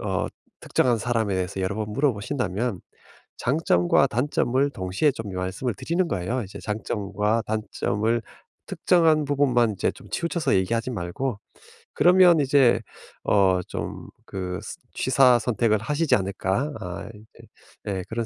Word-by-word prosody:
어 - - -1 0.3
특정한 120 -2 +1
사람에 110 -4 0
대해서 95 +1 -2
여러 95 +1 -1
번 105 -1 -4
물어보신다면 120 - -1 0.6
장점과 125 - +2
단점을 130 +2 +1
동시에 95 +8 0
좀 105 -5 -7
말씀을 95 +6 -3
드리는 170 - -1
거예요. 105 +7 -2
이제 95 - -10
장점과 105 0 -1
단점을 110 +1 -1 0.4
특정한 160 -4 +3
부분만 130 -5 +2
이제 100 - 0
좀 - - -15
치우쳐서 170 -1 0
얘기하지 115 +6 0
말고 105 +5 -3 0.5
그러면 180 -2 +6
이제 130 -4 +4 0.4
어 95 -2 +3
좀 - - -6 0.2
그 90 -2 -5
스 - - -7 0.2
취사선택을 120 -4 +3
하시지 150 +7 0
않을까? 100 +8 -1
아 90 +3 -6
이제 105 +1 -17 0.4
예 95 -2 -2
그런 115 0 -2
115 Hz, 300 characters per minute, -24 LUFS, 100-135 Hz, 0.6 s, 그러면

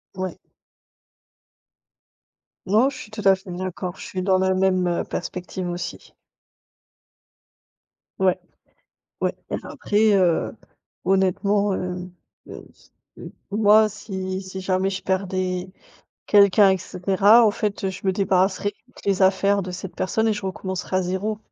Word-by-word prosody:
Ouais. 185 -1 -4 2.3
Non, 220 +8 +3
je 265 - -9
suis 210 - -10
tout 215 0 -6
à 195 -1 +6
fait 190 -1 -11
d'accord, 180 0 -5
je - - -9
suis 185 -1 -4
dans 190 -1 +3
la 190 0 +2
même, 185 -1 +2
heu, 175 - 0
perspective 180 0 -5
aussi. 175 +1 -6 2.1
Ouais, 185 -1 +2 0.8
ouais. - - +1 0.2
Même - - -3
après, 210 0 +1
heu, 180 -4 +2 0.5
honnêtement, 195 +2 +2
heu, 180 0 -4 1.4
moi 215 +1 +5
si, 190 -2 -5
si 190 0 -7
jamais 185 0 0
je 190 -1 -4
perdais 185 -1 -2 0.6
quelqu'un 200 -1 +6
et 190 - +1
cetera, 195 +6 +4
en 210 - +4
fait, 200 -2 -2
je 190 +1 -8
me 190 - +3
débarrasserais 195 +1 +1 0.3
des 195 -1 +1
affaires 200 +1 +3
de 180 - -6
cette 185 +1 -7
personne 220 +4 0
et - - +3
je 210 -2 -4
recommencerais 185 0 -4
à 185 - +2
zéro. 190 +4 -2
190 Hz, 130 wpm, -23 LUFS, 185-200 Hz, 2.3 s, à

